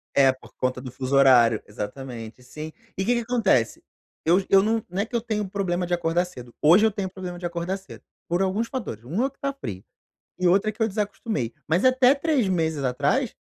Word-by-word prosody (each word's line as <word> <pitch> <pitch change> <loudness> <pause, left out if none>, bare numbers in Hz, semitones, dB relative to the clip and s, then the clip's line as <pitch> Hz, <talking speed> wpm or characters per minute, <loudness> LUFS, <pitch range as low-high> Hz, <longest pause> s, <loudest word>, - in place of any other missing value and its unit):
É, 135 -1 +6
por 130 - -15
conta 130 0 -1
do 130 -2 -7
fuso 130 +1 -2
horário, 120 -5 +6
exatamente 115 +2 -7
sim. 155 +5 -8 0.3
E 190 - -1
que 245 - +3
que 235 - 0
acontece? 220 - +1 0.4
Eu 175 +4 +5
j 190 - -6
eu 195 0 +7
não 225 0 +1
não 190 +3 -1
é - - -1
que 235 - -7
eu 230 - +1
tenho 210 -3 -2
problema 185 -2 -1
de 175 - -3
acordar 170 +1 +1
cedo, 125 -9 -11
hoje 180 +8 +6
eu 220 - +3
tenho 195 -2 -3
problema 180 -2 -7
de 175 - -6
acordar 175 +3 -2
cedo, 195 - -13 0.2
por 175 +2 0
alguns 200 +5 0
fatores, 190 - -5
1 185 - -1
é 275 - 0
que 275 - -31
tá 275 0 -2
frio, 100 - -7 0.6
e 180 - +3
outro 195 +4 +3
é - - -4
que 220 - -11
eu - - +2
desacostumei. 205 - -3
Mas 170 +10 +2
até 255 +1 +5
3 280 -7 +1
meses 160 -5 0
atrás, 125 -1 0
180 Hz, 225 wpm, -25 LUFS, 135-215 Hz, 0.6 s, eu